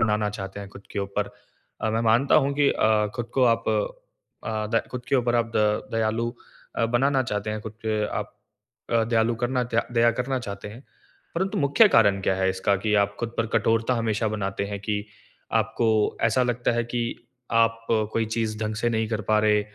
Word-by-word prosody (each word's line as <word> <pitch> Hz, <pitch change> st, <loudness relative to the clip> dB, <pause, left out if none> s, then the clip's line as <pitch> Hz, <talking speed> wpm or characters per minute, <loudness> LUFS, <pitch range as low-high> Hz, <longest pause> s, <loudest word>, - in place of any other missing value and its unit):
बनाना 105 Hz, -1 st, +2 dB
चाहते 100 Hz, -1 st, -6 dB
हैं 100 Hz, -, -8 dB
खुद 100 Hz, 0 st, -13 dB
के -, -, -3 dB
ऊपर। 100 Hz, +1 st, -2 dB, 0.5 s
अ, 110 Hz, -, 0 dB
मैं 115 Hz, -, 0 dB
मानता 115 Hz, +4 st, +3 dB
हूँ 140 Hz, -, 0 dB
कि 145 Hz, -1 st, +3 dB
अ, 110 Hz, -1 st, +2 dB
खुद 120 Hz, -1 st, -3 dB
को 130 Hz, -, +4 dB
आप 115 Hz, -, -9 dB, 0.8 s
अ, -, -, -4 dB, 0.3 s
द 115 Hz, -, +3 dB
खुद 125 Hz, -1 st, -6 dB
के -, -, +1 dB
ऊपर 120 Hz, -1 st, +1 dB
आप 115 Hz, -1 st, +1 dB
द 105 Hz, 0 st, +1 dB
दयालु 115 Hz, +1 st, 0 dB, 0.5 s
अ, 115 Hz, -, +2 dB
बनाना 130 Hz, +3 st, +2 dB
चाहते 105 Hz, -2 st, -3 dB
हैं, 110 Hz, 0 st, -3 dB
खुद 110 Hz, 0 st, -7 dB
पे 110 Hz, -1 st, 0 dB
आप -, -, -4 dB, 0.6 s
अ, 115 Hz, -1 st, +3 dB
दयालु 115 Hz, 0 st, +2 dB
करना 125 Hz, +1 st, 0 dB
दया 115 Hz, -1 st, -1 dB
दया 115 Hz, 0 st, +4 dB
करना 130 Hz, +1 st, -1 dB
चाहते 100 Hz, -4 st, -7 dB
हैं। 115 Hz, +6 st, -12 dB, 0.5 s
परंतु 195 Hz, +3 st, -1 dB
मुख्य 145 Hz, +10 st, +5 dB
कारण 100 Hz, -, +4 dB
क्या 95 Hz, -, +2 dB
है 95 Hz, 0 st, +1 dB
इसका? 95 Hz, +2 st, +1 dB
कि 105 Hz, +2 st, -1 dB
आप 100 Hz, 0 st, +2 dB
खुद 120 Hz, 0 st, -4 dB
पर 115 Hz, -, +1 dB
कठोरता 115 Hz, +2 st, +2 dB
हमेशा 110 Hz, -1 st, 0 dB
बनाते 100 Hz, -2 st, -2 dB
हैं 100 Hz, 0 st, -4 dB
कि 105 Hz, 0 st, -2 dB, 0.5 s
आपको 115 Hz, +1 st, +1 dB, 0.4 s
ऐसा 115 Hz, +3 st, +3 dB
लगता 120 Hz, -1 st, 0 dB
है 120 Hz, 0 st, 0 dB
कि 120 Hz, 0 st, -2 dB, 0.5 s
आप 115 Hz, 0 st, +2 dB, 0.3 s
कोई 115 Hz, -, +1 dB
चीज़ 110 Hz, -1 st, -2 dB
ढँग 110 Hz, 0 st, -2 dB
से 120 Hz, +2 st, 0 dB
नहीं 110 Hz, -1 st, 0 dB
कर 110 Hz, -1 st, -2 dB
पा 110 Hz, -, +4 dB
रहे, 105 Hz, -1 st, +3 dB
115 Hz, 205 wpm, -25 LUFS, 105-120 Hz, 0.8 s, मुख्य